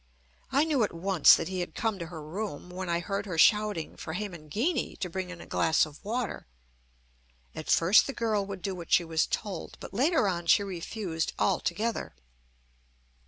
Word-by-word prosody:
I 280 Hz, +3 st, +4 dB
knew 305 Hz, -5 st, +1 dB
at 205 Hz, -, -2 dB
once 185 Hz, -1 st, +6 dB
that -, -, -3 dB
he 185 Hz, 0 st, -3 dB
had 175 Hz, -, -4 dB
come 220 Hz, -4 st, -1 dB
to 170 Hz, -, -5 dB
her 160 Hz, -2 st, -8 dB
room, 180 Hz, +1 st, -5 dB
when 185 Hz, 0 st, -5 dB
I 170 Hz, 0 st, +1 dB
heard 200 Hz, +3 st, -3 dB
her 175 Hz, -4 st, -4 dB
shouting 210 Hz, -3 st, +3 dB
for 160 Hz, -, -6 dB
Hemangini 210 Hz, -, -2 dB
to 180 Hz, -, -4 dB
bring 185 Hz, 0 st, -4 dB
in 180 Hz, -2 st, -8 dB
a -, -, -10 dB
glass 160 Hz, -1 st, +2 dB
of 150 Hz, +3 st, -14 dB
water. 230 Hz, -, -3 dB, 1.1 s
At -, -, -7 dB
first 180 Hz, +6 st, +5 dB
the 275 Hz, -, -3 dB
girl 220 Hz, -4 st, 0 dB
would 195 Hz, -3 st, -7 dB
do 195 Hz, -, -2 dB
what 175 Hz, -2 st, -9 dB
she 175 Hz, -, +5 dB
was 160 Hz, -1 st, 0 dB
told; 200 Hz, -6 st, -4 dB
but -, -, -9 dB
later 275 Hz, -, +3 dB
on 175 Hz, -2 st, -2 dB
she 200 Hz, -, +5 dB
refused 180 Hz, -2 st, -3 dB
altogether. 215 Hz, -, -1 dB
190 Hz, 185 wpm, -29 LUFS, 170-215 Hz, 1.1 s, once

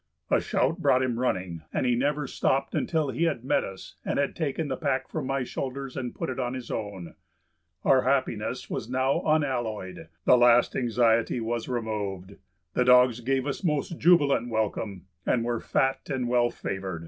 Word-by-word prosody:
A -, -, +4 dB
shout -, -, 0 dB
brought 130 Hz, +1 st, +3 dB
him 120 Hz, -2 st, -1 dB
running, 95 Hz, -9 st, -1 dB
and -, -, -1 dB
he 125 Hz, -, +3 dB
never 145 Hz, +4 st, 0 dB
stopped 135 Hz, +1 st, 0 dB
until 155 Hz, -4 st, 0 dB
he 170 Hz, -, 0 dB
had 145 Hz, -8 st, -1 dB
met -, -, +2 dB
us 95 Hz, -1 st, -9 dB
and -, -, -2 dB
had 140 Hz, 0 st, 0 dB
taken 155 Hz, -1 st, -2 dB
the 135 Hz, -, -2 dB
pack 135 Hz, -2 st, -1 dB
from -, -, -4 dB
my 135 Hz, -1 st, 0 dB
shoulders 135 Hz, +1 st, -5 dB
and 125 Hz, -2 st, -4 dB
put -, -, -3 dB
it 130 Hz, -, -5 dB
on 125 Hz, 0 st, -2 dB
his 125 Hz, -3 st, -7 dB
own. 100 Hz, -6 st, -5 dB, 0.7 s
Our 130 Hz, -1 st, +5 dB
happiness 125 Hz, -3 st, -1 dB
was 110 Hz, -, -4 dB
now 130 Hz, +2 st, +1 dB
unalloyed; 120 Hz, -, -1 dB, 0.2 s
the 125 Hz, -, +6 dB
last 120 Hz, 0 st, +5 dB
anxiety 115 Hz, -1 st, +2 dB
was 115 Hz, +1 st, -3 dB
removed. 100 Hz, -5 st, -4 dB, 0.4 s
The 125 Hz, -, +2 dB
dogs 125 Hz, -1 st, +6 dB
gave 130 Hz, +2 st, 0 dB
us 145 Hz, +6 st, -3 dB
most 155 Hz, 0 st, -1 dB
jubilant 145 Hz, -8 st, +4 dB
welcome 105 Hz, -4 st, -2 dB, 0.2 s
and 115 Hz, +4 st, +1 dB
were 120 Hz, -1 st, -1 dB
fat 135 Hz, 0 st, 0 dB
and 130 Hz, -3 st, -1 dB
well 120 Hz, 0 st, +3 dB
favored. 95 Hz, -6 st, -5 dB
125 Hz, 180 wpm, -27 LUFS, 115-135 Hz, 0.7 s, the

